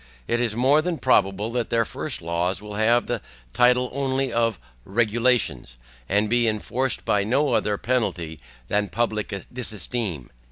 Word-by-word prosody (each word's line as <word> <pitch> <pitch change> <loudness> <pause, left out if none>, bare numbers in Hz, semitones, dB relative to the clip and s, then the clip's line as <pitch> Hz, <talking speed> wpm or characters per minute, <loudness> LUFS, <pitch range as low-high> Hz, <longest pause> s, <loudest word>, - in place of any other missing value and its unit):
It 120 +1 +1
is 115 -3 0
more 135 +6 +4
than 175 0 -2
probable 105 -4 +2
that 120 -1 -2
their 115 -1 +2
first - - -4
laws 85 +2 0
will 105 0 -9
have 115 +3 +3
the 120 -3 -2 0.3
title 125 0 +3
only 135 -1 -1
of 115 -4 +1 0.2
REGULATIONS, 110 - +1 0.3
and 105 +2 +2
be 120 +1 +2
enforced 115 +3 -1
by 100 -1 +2
no 135 +7 +1
other 105 -1 +1
penalty 90 -11 -1 0.3
than 105 -1 0
public 110 -4 -2
disesteem. 110 - -3
115 Hz, 150 wpm, -24 LUFS, 100-125 Hz, 0.3 s, more